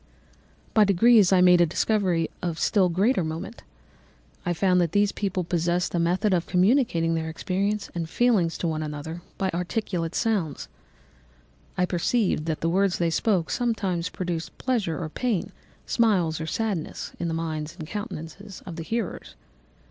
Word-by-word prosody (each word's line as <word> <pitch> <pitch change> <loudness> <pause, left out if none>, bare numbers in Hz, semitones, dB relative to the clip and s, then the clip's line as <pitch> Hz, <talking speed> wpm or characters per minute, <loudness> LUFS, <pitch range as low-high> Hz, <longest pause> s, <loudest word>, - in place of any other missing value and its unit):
"By 215 - +6
degrees 205 +1 +5
I 185 -1 +5
made 180 -1 +6
a 170 - +5
discovery 180 -2 +1
of 170 -3 -2
still 190 -1 +3
greater 190 +4 +2
moment. 165 +8 -5 0.9
I - - +2
found 180 +1 +3
that 170 -2 0
these 205 0 +3
people 190 -3 -2
possessed 175 +1 0
a 175 - +1
method 185 +5 +1
of 175 -2 0
communicating 180 -4 +2
their 160 0 -2
experience 195 +5 -2
and 165 -2 -4
feelings 205 -7 +2
to 170 - -2
one 155 -1 -1
another 155 +2 -5 0.2
by 190 -1 0
articulate 175 -1 -2
sounds. 200 - -1 1.1
I 180 - +3
perceived 180 -2 0
that 160 -2 -2
the 165 - +1
words 190 +1 +2
they 170 -1 +1
spoke 185 -2 +1
sometimes 200 -8 -1
produced 175 -3 -4
pleasure 220 -11 -1
or 165 - -3
pain, 215 +3 -2 0.3
smiles 180 -9 +2
or 160 - -4
sadness, 205 -5 -3
in 170 - -1
the 165 - -2
minds 155 -2 -4
and 155 - -7
countenances 200 -1 -7
of 175 -3 -7
the 165 - -4
hearers. 215 - -4
180 Hz, 160 wpm, -25 LUFS, 165-205 Hz, 1.1 s, By